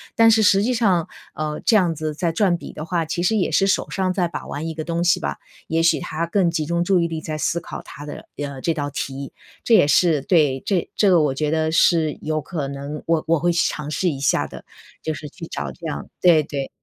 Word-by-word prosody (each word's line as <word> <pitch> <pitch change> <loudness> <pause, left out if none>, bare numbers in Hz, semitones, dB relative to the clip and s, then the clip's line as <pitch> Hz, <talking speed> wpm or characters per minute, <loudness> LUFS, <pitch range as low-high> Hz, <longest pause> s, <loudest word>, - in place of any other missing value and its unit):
但 225 0 +6
是 220 - +4
实 195 -1 +5
际 250 +3 +1
上， 195 -8 +2 0.3
呃， 150 -1 -3
这 225 - +4
样 175 -5 +2
子 155 0 -3
在 165 +2 -1
转 185 -1 +2
笔 - - -9
的 155 - -6
话， 170 -1 -1
其 170 +2 -2
实 220 +4 +2
也 185 - +1
是 195 - +3
手 195 - +1
上 190 -1 0
在 180 -2 +1
把 170 - -7
玩 155 +3 -4
一 160 - -4
个 155 0 -5
东 170 0 -1
西 175 - +3
吧， 70 0 -3 0.3
也 165 +1 +1
许 170 - +4
他 165 +2 -3
更 175 0 +2
集 160 -2 -1
中 170 +2 0
注 185 0 +3
意 170 - +1
力 165 -1 -4
在 155 -1 -4
思 170 +2 0
考 - - -7
他 145 +2 -10
的， 145 - -8
呃， 140 -2 -5
这 165 - +1
道 145 -2 -3
题， 140 -1 -5 0.3
这 235 - +3
也 180 -8 +6
是 160 -2 +3
对， 145 -5 +2
这 195 -5 0
这 205 - +3
个 175 -3 +5
我 145 -3 +1
觉 150 +2 -1
得 160 0 +1
是 160 -2 +3
有 155 0 -1
可 150 -3 -4
能 140 +2 -6
我 165 -1 +1
我 165 0 +3
会 175 +3 +2
去 170 - +2
尝 150 -1 -5
试 180 +3 +1
一 140 - -4
下 - - +2
的， - - -11 0.4
就 160 - -1
是 150 0 -7
去 165 +3 -9
找 70 -1 -4
这 - - -12
样 70 0 -5
对 170 -3 +6
对。 140 -2 -4
165 Hz, 275 characters per minute, -22 LUFS, 150-175 Hz, 0.4 s, 但